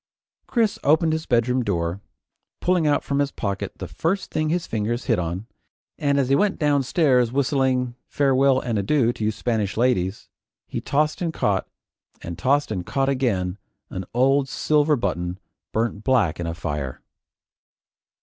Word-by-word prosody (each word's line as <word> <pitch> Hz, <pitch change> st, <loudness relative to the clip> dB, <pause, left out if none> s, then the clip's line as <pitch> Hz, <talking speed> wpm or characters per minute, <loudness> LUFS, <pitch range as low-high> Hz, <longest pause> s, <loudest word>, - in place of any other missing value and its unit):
Chris 225 Hz, -4 st, +1 dB
opened 160 Hz, +2 st, +3 dB
his 160 Hz, +1 st, -3 dB
bedroom 125 Hz, +1 st, +2 dB
door, 85 Hz, -2 st, -1 dB, 0.6 s
pulling 180 Hz, -3 st, +2 dB
out 145 Hz, -, +2 dB
from 140 Hz, 0 st, -1 dB
his 140 Hz, -1 st, +2 dB
pocket 100 Hz, -3 st, -3 dB
the -, -, -6 dB
first 195 Hz, +4 st, -2 dB
thing 155 Hz, 0 st, 0 dB
his 175 Hz, +1 st, 0 dB
fingers 115 Hz, +3 st, -2 dB
hit 115 Hz, -7 st, +2 dB
on, 90 Hz, +4 st, -3 dB, 0.5 s
and 140 Hz, -1 st, +2 dB
as 135 Hz, -, +2 dB
he 135 Hz, -, +5 dB
went 205 Hz, +6 st, +2 dB
downstairs 140 Hz, -4 st, +2 dB
whistling, 130 Hz, -2 st, +1 dB
"Farewell 135 Hz, -1 st, +3 dB
and 115 Hz, -5 st, -1 dB
Adieu, 120 Hz, +3 st, +2 dB
to 110 Hz, -, -6 dB
you 105 Hz, -, +2 dB
Spanish 110 Hz, -3 st, -2 dB
Ladies," 110 Hz, -6 st, +1 dB, 0.4 s
he -, -, -5 dB
tossed 150 Hz, +3 st, 0 dB
and 170 Hz, -2 st, 0 dB
caught, 100 Hz, -10 st, 0 dB, 0.5 s
and 85 Hz, -, -6 dB
tossed 140 Hz, +3 st, +1 dB
and 95 Hz, -4 st, -2 dB
caught 135 Hz, +7 st, 0 dB
again, 105 Hz, -9 st, 0 dB, 0.3 s
an 95 Hz, -, -4 dB
old 135 Hz, +2 st, +3 dB
silver 150 Hz, +2 st, +2 dB
button 90 Hz, -6 st, -2 dB, 0.3 s
burnt 110 Hz, -1 st, -1 dB
black 115 Hz, -12 st, +2 dB
in 85 Hz, -, -3 dB
a 85 Hz, -, -3 dB
fire. 75 Hz, -6 st, -4 dB
125 Hz, 160 wpm, -23 LUFS, 100-145 Hz, 0.6 s, he